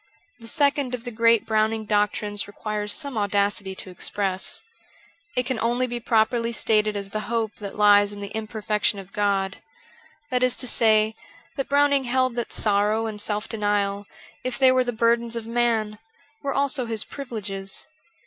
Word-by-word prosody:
The 230 - -9
second 280 -2 +1
of 235 - -10
the 245 - -5
great 230 0 +3
Browning 220 0 +1
doctrines 205 0 +1
requires 210 0 -3
some 280 -5 -2
audacity 200 -1 0
to 190 - -8
express. 190 +1 -1 0.7
It 250 - +1
can 255 -3 -2
only 240 +2 +1
be 240 -1 -4
properly 230 0 +1
stated 215 -1 +2
as 200 -1 -5
the 215 - -2
hope 225 -2 -1
that 200 -2 -7
lies 205 -1 +6
in 205 - -7
the 200 0 -7
imperfection 215 -1 -1
of 195 -1 -10
God 195 -2 0 0.4
— 470 -10 -29
that 250 -1 +1
is 255 -1 +3
to 250 - -3
say, 220 -2 +3 0.4
that 275 - -3
Browning 285 -1 +3
held 255 0 +1
that 240 -1 -3
sorrow 210 +1 +1
and 210 -2 -5
self 210 0 -2
denial, 205 -2 -1 0.4
if 255 -1 -2
they 265 -1 +6
were 255 0 +3
the 245 - -2
burdens 235 0 +1
of 230 -1 -4
man, 225 -2 0 0.4
were 280 - -2
also 270 -3 +1
his 225 -2 -1
privileges. 205 -8 -4
220 Hz, 170 wpm, -24 LUFS, 205-245 Hz, 0.7 s, lies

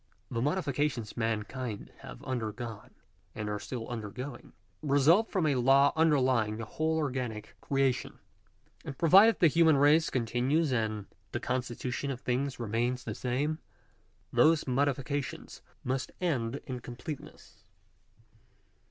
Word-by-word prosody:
The 115 - -1
modifications 145 - -1
mankind 115 0 -3
have - - -10
undergone, 115 -3 -5 0.4
and 105 - -4
are 105 0 -2
still 120 -1 -6
undergoing, 120 +3 -7 0.3
result 155 +9 +4
from 185 -5 0
a 150 - +3
law 135 +2 +4
underlying 130 -9 +3
the 115 - -5
whole 160 +7 -1
or 150 -4 0
ganic 115 -4 -4
creation; 135 -2 0 0.7
and 135 - -7
provided 195 +7 +7
the 170 - +6
human 160 -1 +5
race 150 +3 +5
continues, 130 +6 +1
and 110 -3 -1 0.3
the - - -1
constitution 125 +2 -3
of 130 -3 -3
things 130 +1 -2
remains 120 +2 -1
the 110 - -4
same, 140 +8 -1 0.7
those 160 0 +4
modifications 140 +1 -2 0.2
must 130 +1 -2
end 130 -9 0
in 130 -2 -5
completeness. 125 +5 -9
130 Hz, 125 wpm, -30 LUFS, 120-145 Hz, 0.7 s, provided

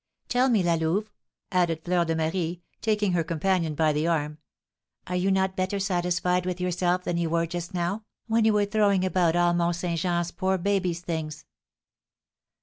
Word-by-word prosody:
Tell 250 +2 +3
me, 220 -6 +3
La 170 -1 +2
Louve," 170 +7 0 0.4
added 170 -3 +1
Fleur 175 -1 +2
de 165 0 -1
Marie, 165 +1 -2 0.2
taking 210 -3 +1
her 175 -2 +1
companion 165 0 0
by 155 0 +2
the 150 +2 0
arm, 150 -2 -1 0.7
"are 180 - -3
you 180 +2 +1
not 190 0 +1
better 185 +2 -1
satisfied 180 -1 0
with 180 0 -3
yourself 180 0 0
than 175 - -1
you 170 -1 0
were 170 +1 +1
just 175 +3 -5
now, 180 +5 -2 0.2
when 225 0 +2
you 220 0 +4
were 205 -1 +3
throwing 200 -3 +2
about 180 -3 +2
all 175 0 +3
Mont 175 0 +1
Saint 170 -1 -2
Jean's 175 0 0
poor 190 +2 0
baby's 185 -2 0
things?" 160 -3 -4
175 Hz, 180 wpm, -26 LUFS, 170-190 Hz, 0.7 s, you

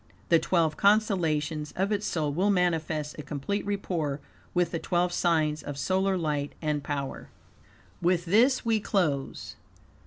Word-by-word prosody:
The 165 - +6
twelve 165 -4 +1
constellations 165 -8 +1
of 195 +3 0
its 210 0 0
soul 150 -4 -1
will 190 +7 +1
manifest 160 -5 0
a - - -2
complete 150 +8 -3
rapport 170 -8 -2 0.3
with 175 -2 +1
the 165 - -2
twelve 175 +1 0
signs 155 -4 +1
of 145 -1 -6
solar 190 +4 +1
light 150 -4 -2
and 150 -2 -1
power. 140 -2 -4 0.7
With 175 0 +2
this 240 +9 +3
we 225 -1 +2
close. 155 -10 -1
170 Hz, 145 wpm, -28 LUFS, 150-190 Hz, 0.7 s, The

